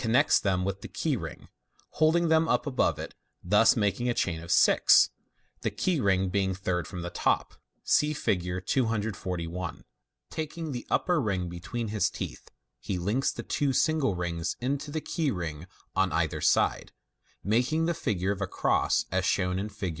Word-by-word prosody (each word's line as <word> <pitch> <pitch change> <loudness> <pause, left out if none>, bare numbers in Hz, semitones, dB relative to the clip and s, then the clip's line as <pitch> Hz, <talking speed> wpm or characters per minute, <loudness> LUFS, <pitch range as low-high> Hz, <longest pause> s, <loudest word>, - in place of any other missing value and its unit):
405 115 +1 0
riects - - +4
them 95 -2 0
with 100 0 -3
the - - -7
key - - -1
ring, - - -7 0.4
holding 160 +2 +3
them 160 0 +3
up 120 0 +2
above 135 -3 +1
it, - - -7 0.3
thus 105 +5 +5
making 105 +3 +1
n 120 - 0
chain 80 -3 -1
of 85 - -10
six, - - +6 0.5
the - - 0
key 180 -5 0
ring 95 -4 +2
being 95 0 0
third 90 -2 -2
from 90 -3 -6
the 85 - -5
top. - - 0 0.3
(See 150 0 +3
Fig. 90 - -1
241.) 95 - -2 0.5
Taking 160 0 -4
the 120 -2 -6
upper 175 -3 +2
ring 95 -6 -1
between 110 +7 -5
his 105 -1 +1
teeth, - - -7 0.3
he 90 +9 -3
links 105 +10 0
the - - -7
two 140 -2 0
single 155 - +2
rings 85 -1 -2
into 140 +4 -2
the 155 +1 -3
key 160 -3 -1
ring 85 - -4 0.3
on 95 -1 +2
either 80 -1 -1
side, - - +2 0.5
making 125 +10 +1
the 170 - +1
figure 100 - -1
of 100 -1 -4
a 100 - 0
cross, - - +1
as - - +1
shown 90 0 +1
in 105 +2 -3
Fig. 100 -2 -4
100 Hz, 175 wpm, -28 LUFS, 90-135 Hz, 0.5 s, six